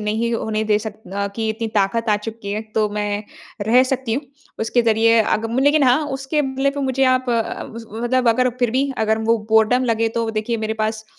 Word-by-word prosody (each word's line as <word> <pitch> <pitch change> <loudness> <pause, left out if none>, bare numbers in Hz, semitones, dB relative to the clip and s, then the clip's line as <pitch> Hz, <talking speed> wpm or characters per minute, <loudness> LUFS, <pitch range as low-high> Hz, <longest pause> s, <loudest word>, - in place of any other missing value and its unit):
नहीं 220 +3 -1
होने 220 -1 -1
दे 210 -1 +2
सक 215 -1 -5 0.2
अ, 200 0 -1
कि 220 -1 -1
इतनी 225 +1 -3
ताकत 220 +4 0
आ 205 - +4
चुकी 220 -3 -5
है, 215 - -2
तो 215 -1 +2
मैं 205 0 -2 0.4
रह 245 +3 +5
सकती 255 -4 -1
हूँ। 280 - -2 0.4
उसके 230 +2 +1
ज़रिए 230 0 +4
अग 220 +1 0
लेकिन 290 +2 +4
हाँ, 250 +3 +5 0.2
उसके 295 +3 -1
बदले 270 +1 0
पे 285 0 -5
मुझे 265 +1 +1
आप 255 0 -2
अ, 230 -1 -1 0.4
मतलब 250 0 +2
अगर 250 +2 +3
फिर 245 -2 +1
भी 275 0 +1
अगर 220 0 +1
वो 225 +1 +2
बोरडम 220 +3 +4
लगे, 230 -1 +1
तो 230 0 -2
देखिए, 220 +2 -2
मेरे 220 - -2
पास 220 0 -3
225 Hz, 210 wpm, -20 LUFS, 220-250 Hz, 0.4 s, रह